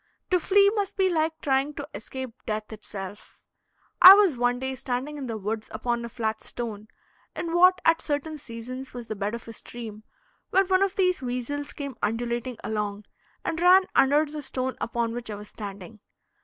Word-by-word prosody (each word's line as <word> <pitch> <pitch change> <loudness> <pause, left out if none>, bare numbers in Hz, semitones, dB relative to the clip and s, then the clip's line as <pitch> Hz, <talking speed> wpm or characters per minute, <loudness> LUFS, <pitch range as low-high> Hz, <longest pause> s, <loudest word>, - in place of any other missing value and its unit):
To 360 - +4
flee 400 +3 +5
must 410 -3 -2
be 380 -1 +3
like 320 -1 0
trying 275 +1 +1
to 285 - -6
escape 260 +2 -6 0.2
death 215 0 -3
itself. 205 -1 -9 0.6
I 370 +2 +13
was 400 -8 +4
one 245 0 +1
day 265 +1 -3
standing 260 +3 -3
in 265 - -5
the 225 -2 -3
woods 215 +2 -4
upon 235 +2 -2
a 235 - -5
flat 220 -2 -2
stone, 215 -3 -6 0.5
in 335 -1 -3
what 365 +1 +6
at 330 0 +4
certain 300 +1 -3
seasons 255 +2 -8
was 240 -2 -7
the 215 - -2
bed 205 +2 -2
of 235 - -9
a 230 - -7
stream, 220 -2 -9 0.5
when 385 +1 +4
one 375 0 +4
of 395 -1 +1
these 365 -4 +2
weasels 255 +3 -3
came 280 -4 -6
undulating 235 +2 -2
along 210 -1 -3 0.4
and 325 +1 -2
ran 365 +2 +7
under 290 +3 +4
the 300 0 -6
stone 260 -1 -3
upon 230 0 -1
which 240 -1 -6
I 210 - -4
was 210 +1 -9
standing. 200 0 -8
250 Hz, 185 wpm, -26 LUFS, 225-310 Hz, 0.6 s, I